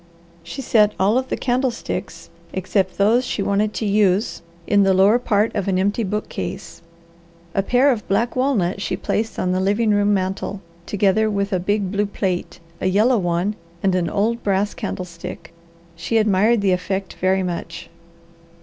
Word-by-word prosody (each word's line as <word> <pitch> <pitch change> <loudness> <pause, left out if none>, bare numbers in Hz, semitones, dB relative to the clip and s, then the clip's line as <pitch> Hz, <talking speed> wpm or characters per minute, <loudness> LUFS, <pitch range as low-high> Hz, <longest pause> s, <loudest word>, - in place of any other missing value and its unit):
She 270 +10 -7
set 210 -3 +3
all 200 +4 +3
of 260 - -5
the - - -1
candlesticks, 250 -1 -3 0.2
except 190 0 -1
those 220 +5 +3
she 215 -5 -2
wanted 205 +2 +1
to 220 - -2
use, 205 0 +1 0.2
in 205 -1 +3
the 195 -1 +4
lower 200 +5 +5
part 215 -2 +1
of 200 -3 -1
an 190 -1 +1
empty 205 +4 +1
bookcase. 205 -1 -5 0.7
A 195 - +2
pair 250 +7 +3
of 225 -5 -3
black 225 +5 0
walnut 220 -9 0
she 185 -2 -2
placed 220 +2 -2
on 180 - 0
the 185 - +1
living 205 +4 +1
room 205 0 +3
mantel, 195 0 -2 0.3
together 205 +2 +2
with 200 -1 -1
a 185 - +1
big 200 +1 -1
blue 205 0 0
plate, 185 -4 -3 0.2
a - - +1
yellow 215 +6 +3
one, 175 +3 -1 0.3
and 195 -1 +2
an 180 -2 0
old 230 +4 0
brass 200 +1 0
candlestick. 170 -2 -7 0.4
She 225 +7 -1
admired 215 +1 +3
the 195 -1 +2
effect 190 +1 -2
very 190 +1 +2
much. 175 -2 -5
200 Hz, 170 wpm, -21 LUFS, 190-220 Hz, 0.7 s, lower